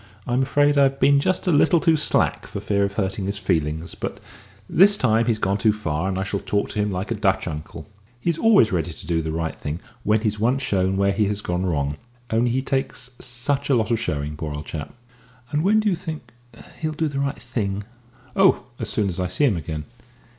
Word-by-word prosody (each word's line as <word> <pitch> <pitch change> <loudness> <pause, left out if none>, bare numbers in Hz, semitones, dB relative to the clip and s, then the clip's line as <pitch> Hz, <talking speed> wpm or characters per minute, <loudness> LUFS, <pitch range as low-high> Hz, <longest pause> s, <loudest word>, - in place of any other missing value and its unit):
I'm 125 +2 +1
afraid 145 +2 +3
I've 135 -1 +3
been 140 +1 +5
just 185 +6 0
a 180 - +2
little 165 +3 +4
too 160 0 +4
slack 155 - +1
for - - -5
fear 100 0 0
of 100 0 -1
hurting 95 -1 -2
his 100 +1 -2
feelings; 80 -4 -1
but - - -5 0.5
this 200 +3 +5
time 115 -1 +2
he's 115 -2 +2
gone 100 -1 0
too 110 +1 +4
far, 95 -4 -2
and 95 - -2
I 95 - 0
shall 100 0 -2
talk 100 +1 -1
to - - -4
him 105 0 +1
like 95 +4 -3
a - - +3
Dutch 100 -4 +1
uncle. 80 0 -6 0.3
He's 165 +4 -1
always 215 - +5
ready 85 -2 -1
to 95 - -12
do 80 0 0
the 80 0 -3
right 80 0 -2
thing 75 +3 -5 0.2
when 105 +1 +2
he's 105 -2 -1
once 125 +5 +1
shown 95 -4 +1
where 100 0 +3
he 105 +2 +1
has 105 +1 -1
gone 90 -1 -1
wrong 75 -3 -1 0.3
only 115 +2 +2
he 130 +2 0
takes 135 -2 -2
such 140 +4 -2
a 135 - +5
lot 110 -1 +1
of 115 - +2
showing, 75 -7 -2
poor 75 -1 -5
old 75 +1 -6
chap!" 75 -2 -6 0.6
"But 150 - +1
when 205 +5 +4
do 215 - 0
you 195 - +3
think 160 -8 -7 0.5
he'll 155 -1 -2
do 160 +1 0
the 140 -2 -3
right 140 +1 -1
thing?" 105 -5 -3 0.5
"Oh, 195 -1 +4 0.2
as - - -2
soon 105 -2 +1
as 95 -1 -3
I 90 - 0
see 95 +11 +1
him 115 -8 +3
again." 80 -2 -5
105 Hz, 230 wpm, -23 LUFS, 90-135 Hz, 0.6 s, been